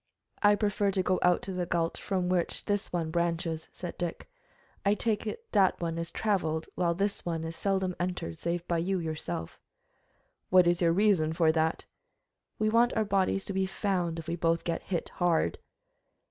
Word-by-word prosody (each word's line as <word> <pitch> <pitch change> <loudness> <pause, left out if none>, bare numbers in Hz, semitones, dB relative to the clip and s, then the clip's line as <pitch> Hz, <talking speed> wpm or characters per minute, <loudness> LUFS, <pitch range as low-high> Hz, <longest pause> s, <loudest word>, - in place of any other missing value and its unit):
"I 205 0 +6
prefer 205 -1 +1
to 190 -1 +1
go 185 0 +1
out 180 -1 +3
to 195 - -4
the 180 -1 -2
gulch 165 -1 -1
from 185 -3 -1
which 180 -1 0
this 205 0 -1
one 165 -2 -1
branches," 170 -1 -1
said 175 -2 -7
Dick. 175 -2 -4 0.6
"I 200 +1 +3
take 220 0 -1
it 460 - -5
that 195 -2 +3
one 165 -1 -2
is 170 - -4
traveled, 165 -7 0
while 170 -2 +1
this 200 +2 -1
one 165 -2 -2
is 165 0 -5
seldom 190 -2 0
entered 175 - -3
save 170 0 -2
by 170 -1 +1
you 190 +3 0
yourself." 155 - -4 0.9
"What's 175 -1 +5
your 170 -1 +4
reason 180 -4 +3
for 160 -1 +4
that?" 160 0 0 0.7
"We 215 - +1
want 235 +2 +4
our 220 - +2
bodies 195 -1 +1
to 195 - -4
be 190 0 +1
found, 180 -4 -1
if 165 - -7
we 170 - -1
both 165 -1 +1
get 170 -1 -2
hit 175 -4 -3
hard." 175 -2 +1
175 Hz, 185 wpm, -29 LUFS, 165-195 Hz, 0.9 s, I